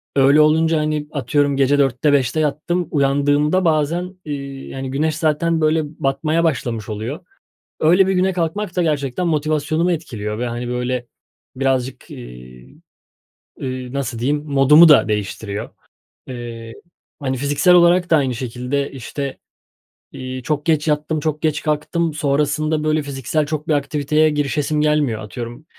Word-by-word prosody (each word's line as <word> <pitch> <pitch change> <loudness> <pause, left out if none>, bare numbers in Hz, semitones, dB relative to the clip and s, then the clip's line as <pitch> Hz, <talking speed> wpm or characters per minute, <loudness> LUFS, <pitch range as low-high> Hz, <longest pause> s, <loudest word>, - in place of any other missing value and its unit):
öyle 140 +2 +5
olunca, 160 +1 +3
hani, 150 -1 -2
atıyorum 140 +1 0
gece 140 +1 +3
4'te 140 +1 +2
5'te 140 +3 +1
yattım, 155 +3 -1
uyandığımda 145 +5 +2
bazen, 165 +4 0
iii, 140 -2 -6
yani, 135 0 -5
güneş 155 +2 0
zaten, 160 +1 +1
böyle, 155 +1 +2
batmaya 150 +3 -1
başlamış 120 -8 -1
oluyor. 110 +8 -4 0.6
Öyle 180 +5 +4
bir 190 - +1
güne 190 +1 +1
kalkmak 180 +3 -2
da 180 - +1
gerçekten 150 +2 -1
motivasyonumu 155 +2 0
etkiliyor 110 -10 -4
ve, 125 - -1
hani, 120 +1 -4
böyle, 125 0 -2 0.5
birazcık, 130 -1 -2
iii, - - -12 0.8
eee, 130 -1 -5
nasıl 130 -4 -3
diyeyim, 145 +5 0
modumu 150 +3 +6
da 145 -7 +6
değiştiriyor. 105 0 -3 0.6
Eee, 115 -2 -7 0.5
hani, 130 -3 -2
fiziksel 145 +6 +3
olarak 175 +1 +5
da 160 - +5
aynı 130 -3 0
şekilde, 125 +3 -3
işte, 135 +1 -5 0.7
iii, 130 -1 -7
çok 150 0 -2
geç 155 -1 +1
yattım, 150 +1 0
çok 155 0 -2
geç 155 -2 0
kalktım. 155 +2 -1
Sonrasında, 150 +1 0
böyle, 155 0 +1
fiziksel 140 +2 -2
çok 155 +1 -4
bir 155 - +2
aktiviteye 150 +2 +1
girişesim 150 0 -1
gelmiyor. 150 -7 +1
Atıyorum 120 +6 -8
145 Hz, 140 wpm, -19 LUFS, 130-155 Hz, 0.8 s, modumu